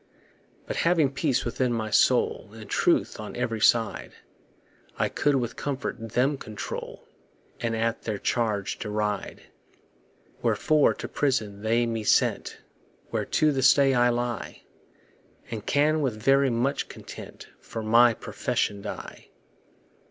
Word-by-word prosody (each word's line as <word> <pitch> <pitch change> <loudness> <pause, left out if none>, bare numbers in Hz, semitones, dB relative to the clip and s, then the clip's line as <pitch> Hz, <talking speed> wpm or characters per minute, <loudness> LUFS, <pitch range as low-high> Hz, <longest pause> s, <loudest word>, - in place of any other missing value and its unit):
But - - -4
having 165 -5 +3
peace 140 -1 0
within 125 +1 0
my 110 -2 -2
soul, 120 -1 +2
And 110 -2 -10
truth - - +1
on 105 - -7
every 115 -3 -2
side, 115 +1 +2 0.8
I - - +1
could 145 -1 +1
with 120 -3 -2
comfort 130 -5 -4
them 135 +3 +1
control, 110 -1 -7 0.5
And 115 -1 -1
at 115 +1 -1
their 110 -2 -3
charge 105 -3 -1
deride. 105 -1 -3 1.0
Wherefore 155 -2 +3
to - - -6
prison 110 -8 -1
they 115 +2 +2
me 115 -2 -3
sent, - - +1 0.5
Where - - -1
to 155 -1 +2
this 135 -2 +5
day 140 -1 +4
I 120 -1 +4
lie; 120 0 -3 0.9
And 110 -3 -4
can 155 +2 +2
with 125 -7 -1
very 135 +3 +4
much 120 +4 -1
content - - -10
For 115 - -7
my 115 +1 +5
profession 100 -1 -2
die. 105 - -8
120 Hz, 130 wpm, -26 LUFS, 110-135 Hz, 1.0 s, this